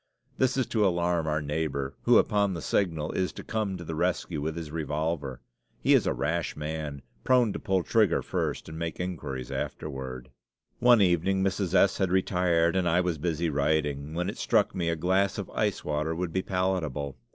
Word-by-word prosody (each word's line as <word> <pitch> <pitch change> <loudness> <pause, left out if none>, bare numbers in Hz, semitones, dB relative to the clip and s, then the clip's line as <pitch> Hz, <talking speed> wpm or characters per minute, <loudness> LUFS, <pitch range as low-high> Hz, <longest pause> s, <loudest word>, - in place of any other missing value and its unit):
This 130 0 +2
is 130 - +2
to 110 -2 +2
alarm 85 -3 +1
our 75 0 0
neighbor, 70 -2 -2
who, - - +7
upon 100 -2 +2
the 85 - -5
signal, 80 -6 0
is 95 -1 -1
to - - -8
come 105 -4 -2
to 85 - -8
the 80 - -5
rescue 85 -1 -1
with 80 +2 -2
his 80 -3 -6
revolver. 75 -4 -2 0.4
He - - +3
is - - +4
a - - +2
rash 85 +2 -1
man, 75 -2 -5 0.2
prone 125 -5 +3
to - - -4
pull 95 -2 0
trigger 110 +1 +2
first - - -2
and 80 0 -7
make 85 -1 -4
inquiries 75 -8 -4
afterward. 65 -3 -5 0.5
One 120 -3 +6
evening 95 +2 +2
Mrs. 95 -1 0
S. 100 0 +4
had 95 -2 +2
retired 90 -2 +2
and 90 -2 +2
I 85 +2 +3
was 90 -3 0
busy 85 0 -1
writing, 75 0 0
when 90 +1 -1
it 100 - -5
struck - - +2
me 85 -2 -1
a 85 - +1
glass 95 +4 +1
of - - -5
ice - - -1
water 75 +2 -1
would 85 -1 -3
be 95 - +1
palatable. 90 -8 -1
85 Hz, 195 wpm, -28 LUFS, 75-95 Hz, 0.5 s, who